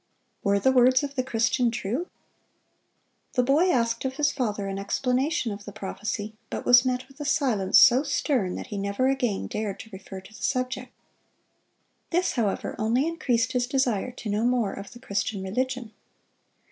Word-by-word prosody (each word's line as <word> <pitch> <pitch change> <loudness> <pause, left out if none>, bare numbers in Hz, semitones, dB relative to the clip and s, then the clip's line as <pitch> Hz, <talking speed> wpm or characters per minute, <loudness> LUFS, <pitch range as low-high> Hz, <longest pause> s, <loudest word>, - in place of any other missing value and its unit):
Were 200 0 +3
the 230 +7 +3
words 255 +1 +5
of 280 -1 -4
the 265 - 0
Christian 235 0 +1
true? 240 - -3 1.3
The 250 - +2
boy 295 +8 +3
asked 230 -6 +1
of 265 0 -2
his 295 +1 +2
father 215 -7 -2
an 195 0 -3
explanation 255 +5 0
of 205 0 -7
the 205 - -8
prophecy, 210 +1 -4 0.2
but - - -5
was 245 0 +7
met 255 0 -1
with 270 +1 -20
a - - -3
silence 250 -10 +3
so 255 +1 +7
stern 250 - 0
that - - -5
he 200 - -2
never 200 +6 0
again 245 -7 0
dared 210 -2 -4
to 220 - -14
refer 190 0 -8
to 190 +3 -16
the 235 - -13
subject. 255 -1 -2 1.2
This, 360 +2 +1
however, 220 -6 -1
only 235 +6 +2
increased 250 -8 0
his 250 -2 0
desire 255 -5 0
to 235 - -8
know 210 +2 0
more 240 -4 +1
of 200 0 -8
the 240 - -12
Christian 200 -4 -2
religion. 250 +3 -2
245 Hz, 175 wpm, -26 LUFS, 205-260 Hz, 1.3 s, was